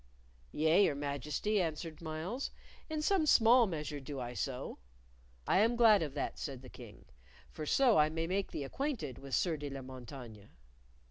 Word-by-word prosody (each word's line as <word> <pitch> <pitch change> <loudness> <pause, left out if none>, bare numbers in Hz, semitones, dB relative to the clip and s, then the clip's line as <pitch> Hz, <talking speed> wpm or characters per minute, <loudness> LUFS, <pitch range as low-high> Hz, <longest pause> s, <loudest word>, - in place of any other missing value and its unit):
"Yea, 160 +6 +4
your - - +1
Majesty," 145 +8 -1
answered 160 -1 -4
Myles. 165 - -4 0.4
"In 310 -1 -2
some 355 -3 +2
small 235 -2 +6
measure 150 -4 -4
do 140 0 -6
I 120 -1 -5
so." 125 0 -4 0.7
"I - - +3
am 230 +3 +3
glad 225 -4 +6
of 150 -3 -3
that," 145 - -3
said 135 -3 -5
the 130 - -10
King; 120 -4 -13 0.5
"for 155 - -6
so 250 - +4
I 150 0 +5
may 165 +1 -2
make 190 +3 -1
thee 145 - -4
acquainted 165 - -3
with 135 -1 -3
Sieur 170 -4 +1
de 145 -1 -5
la 135 -1 -6
Montaigne." 125 -5 -10
155 Hz, 175 wpm, -33 LUFS, 135-210 Hz, 0.7 s, small